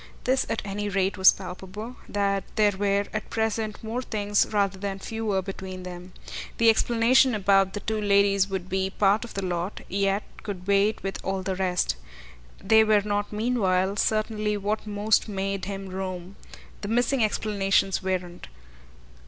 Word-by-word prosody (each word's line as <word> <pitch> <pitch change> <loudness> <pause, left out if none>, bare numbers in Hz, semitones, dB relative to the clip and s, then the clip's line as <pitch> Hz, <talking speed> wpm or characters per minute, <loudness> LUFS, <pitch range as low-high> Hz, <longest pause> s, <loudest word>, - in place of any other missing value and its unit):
This 260 +1 +1
at 225 - -2
any 205 +1 -3
rate 195 0 0
was 190 -1 +8
palpable, 205 +6 -8
that 200 -1 0
there 210 -1 +4
were 200 +1 0
at 215 -1 -4
present 220 -1 -2
more 225 +3 -3
things 205 -4 +1
rather 200 -2 0
than 195 -1 -3
fewer 210 -1 -2
between 190 -1 -7
them. 180 0 -9 0.4
The 230 -1 +6
explanation 240 +2 +3
about 195 -1 +3
the 205 - -4
two 220 +1 -2
ladies 200 -1 +3
would 190 -2 -4
be 190 0 -1
part 200 +2 +2
of 235 - -10
the 195 -1 -2
lot, 175 +2 -3
yet 195 +1 +1 0.2
could 190 -4 -6
wait 200 +2 +2
with 195 -1 -4
all 190 -1 -2
the 190 0 -2
rest. 180 - 0 0.7
They 220 +2 +6
were 215 -1 +4
not 205 0 -1
meanwhile 200 -4 +1
certainly 215 0 0
what 210 +2 -2
most 210 +1 +1
made 195 -1 -2
him 195 0 -5
roam 185 0 -5 0.5
the 200 - -4
missing 240 +3 +2
explanations 195 -3 +1
weren't. 180 -2 -3
200 Hz, 160 wpm, -26 LUFS, 190-215 Hz, 0.7 s, was